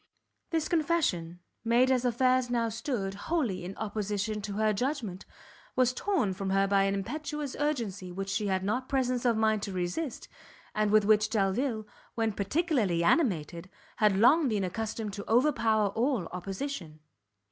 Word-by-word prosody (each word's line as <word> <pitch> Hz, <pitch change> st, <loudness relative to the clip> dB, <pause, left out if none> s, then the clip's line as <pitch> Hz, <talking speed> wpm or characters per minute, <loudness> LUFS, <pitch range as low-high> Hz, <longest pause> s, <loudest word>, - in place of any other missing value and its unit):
This 325 Hz, -2 st, 0 dB
confession, 285 Hz, -, 0 dB, 0.2 s
made, 240 Hz, +3 st, +3 dB
as 255 Hz, -1 st, +2 dB
affairs 255 Hz, +1 st, +2 dB
now 235 Hz, -2 st, +1 dB
stood, 225 Hz, -4 st, -3 dB
wholly 220 Hz, -, -2 dB
in 185 Hz, +2 st, -7 dB
opposition 210 Hz, 0 st, -2 dB
to 205 Hz, 0 st, -5 dB
her 215 Hz, +1 st, +2 dB
judgment, 225 Hz, -5 st, -3 dB, 0.5 s
was 255 Hz, -1 st, +3 dB
torn 315 Hz, -, 0 dB
from 195 Hz, +1 st, -4 dB
her 195 Hz, +1 st, +3 dB
by 195 Hz, 0 st, +3 dB
an 195 Hz, 0 st, +1 dB
impetuous 295 Hz, +6 st, -4 dB
urgency 225 Hz, -11 st, -2 dB
which 195 Hz, +2 st, -5 dB
she 200 Hz, +1 st, -1 dB
had 190 Hz, -1 st, 0 dB
not 250 Hz, +6 st, -1 dB
presence 255 Hz, -2 st, 0 dB
of 235 Hz, -2 st, +3 dB
mind 220 Hz, -1 st, +2 dB
to 200 Hz, -, -4 dB
resist, 185 Hz, -, -3 dB, 0.5 s
and 215 Hz, 0 st, +1 dB
with 215 Hz, 0 st, +4 dB
which 215 Hz, 0 st, +4 dB
Delvile, 220 Hz, +2 st, 0 dB, 0.3 s
when 225 Hz, -1 st, +1 dB
particularly 205 Hz, -, 0 dB
animated, 175 Hz, -, +1 dB, 0.3 s
had 210 Hz, -3 st, +3 dB
long 290 Hz, +8 st, +5 dB
been 210 Hz, -5 st, 0 dB
accustomed 215 Hz, +2 st, -3 dB
to 200 Hz, +2 st, -6 dB
overpower 225 Hz, -5 st, +3 dB
all 230 Hz, -1 st, 0 dB
opposition. 185 Hz, -, -5 dB
215 Hz, 155 wpm, -29 LUFS, 195-255 Hz, 0.5 s, long